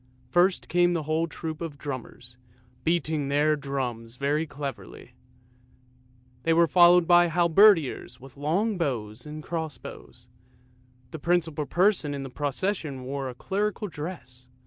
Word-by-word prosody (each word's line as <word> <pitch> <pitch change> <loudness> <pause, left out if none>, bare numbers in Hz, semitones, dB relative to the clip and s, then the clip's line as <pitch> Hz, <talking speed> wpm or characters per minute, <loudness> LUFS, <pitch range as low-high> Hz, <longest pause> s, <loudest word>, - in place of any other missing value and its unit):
First 180 +1 +2
came 175 0 +2
a 160 - -3
whole 160 +2 0
troop 160 -1 -6
of 160 -4 -5
drummers, 125 -3 -8 0.4
beating 160 -3 0
their 145 +2 +2
drums 125 -5 -4
very 145 +4 0
cleverly; 135 -9 -8 1.3
they 165 +5 +2
were 170 +1 +5
followed 175 +2 +6
by 175 0 +6
halberdiers 170 - +3
with 130 0 -14
long 180 +9 0
bows 115 -6 -3
and 155 +1 -7
cross 160 -3 -4
bows. 120 0 -12 0.8
The 160 - -7
principal 160 -2 0
person 175 -4 +2
in 140 - -5
the 135 - -8
procession 145 -1 -2
wore 135 0 -4
a 125 - -8
clerical 210 - -2
dress. 150 -7 -8
155 Hz, 135 wpm, -26 LUFS, 135-175 Hz, 1.3 s, followed